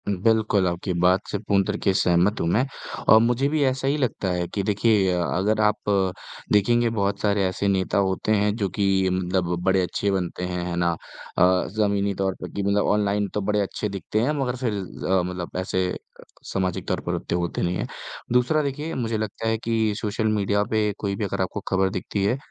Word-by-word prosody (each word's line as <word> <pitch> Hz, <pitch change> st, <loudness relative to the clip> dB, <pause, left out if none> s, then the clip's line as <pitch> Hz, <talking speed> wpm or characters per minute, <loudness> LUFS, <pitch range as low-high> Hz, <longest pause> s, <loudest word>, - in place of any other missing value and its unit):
बिल्कुल, 105 Hz, -1 st, +2 dB
आपकी 90 Hz, +2 st, -2 dB
बात 90 Hz, +3 st, +3 dB
से -, -, 0 dB
पूर्ण 100 Hz, -1 st, +1 dB
तरीके 105 Hz, 0 st, 0 dB
से 95 Hz, -, +1 dB
सहमत 90 Hz, +4 st, +2 dB
हूँ 85 Hz, -, 0 dB
मैं 110 Hz, +9 st, +2 dB, 0.4 s
और 110 Hz, -, +9 dB
मुझे 120 Hz, +4 st, +2 dB
भी 155 Hz, 0 st, 0 dB
ऐसा 135 Hz, 0 st, 0 dB
ही 140 Hz, +2 st, +2 dB
लगता 125 Hz, -8 st, -1 dB
है 90 Hz, -1 st, -1 dB
कि 100 Hz, -, -1 dB
देखिए 105 Hz, -1 st, +2 dB
अ, 90 Hz, -1 st, 0 dB
अगर 105 Hz, +5 st, +1 dB
आप 105 Hz, -1 st, +1 dB, 0.6 s
देखेंगे 120 Hz, +3 st, +3 dB
बहुत 100 Hz, -3 st, -1 dB
सारे 100 Hz, -1 st, +2 dB
ऐसे 95 Hz, +2 st, -2 dB
नेता 95 Hz, -1 st, +1 dB
होते 95 Hz, +1 st, 0 dB
हैं, 105 Hz, -1 st, +2 dB
जो 100 Hz, -4 st, -1 dB
कि 95 Hz, -1 st, +1 dB
मतलब 90 Hz, -1 st, 0 dB
बड़े 95 Hz, 0 st, +3 dB
अच्छे 100 Hz, +2 st, -1 dB
बनते 90 Hz, -2 st, -2 dB
हैं, 90 Hz, -1 st, -2 dB
है 90 Hz, -1 st, -3 dB
ना? 85 Hz, 0 st, +2 dB, 0.5 s
अ, 90 Hz, +1 st, +4 dB
ज़मीनी 100 Hz, -2 st, +1 dB
तौर 95 Hz, -1 st, -1 dB
पे -, -, -5 dB
कि 100 Hz, -, -2 dB
मतलब 100 Hz, +1 st, +2 dB
ऑनलाइन 105 Hz, 0 st, +1 dB
तो 105 Hz, -, -1 dB
बड़े 105 Hz, +1 st, +1 dB
अच्छे 105 Hz, +2 st, -3 dB
दिखते 100 Hz, +2 st, -2 dB
हैं 130 Hz, +6 st, +1 dB
मगर 125 Hz, -2 st, -1 dB
फिर 125 Hz, -3 st, -2 dB
अ, 95 Hz, -1 st, -1 dB
मतलब 90 Hz, -1 st, -5 dB
ऐसे 95 Hz, 0 st, -1 dB, 0.6 s
सामाजिक 95 Hz, -2 st, -1 dB
तौर -, -, -1 dB
पर -, -, -1 dB
उत्ते -, -, -3 dB
होते 85 Hz, -1 st, -2 dB
नहीं 90 Hz, 0 st, 0 dB
हैं। -, -, -3 dB, 0.5 s
दूसरा 125 Hz, +5 st, +3 dB
देखिए, 145 Hz, +3 st, -3 dB
मुझे 115 Hz, -3 st, -1 dB
लगता 110 Hz, +1 st, -3 dB
है 110 Hz, 0 st, +1 dB
कि 110 Hz, -1 st, 0 dB
सोशल 110 Hz, +1 st, -1 dB
मीडिया 105 Hz, -1 st, +1 dB
पे 110 Hz, -1 st, +2 dB
कोई 100 Hz, -1 st, -2 dB
भी 105 Hz, -, -3 dB
अगर 95 Hz, -, -2 dB
आपको 95 Hz, +2 st, -2 dB
खबर 95 Hz, 0 st, +2 dB
दिखती 95 Hz, +1 st, -3 dB
है, 105 Hz, +6 st, +2 dB
100 Hz, 210 wpm, -24 LUFS, 95-110 Hz, 0.6 s, और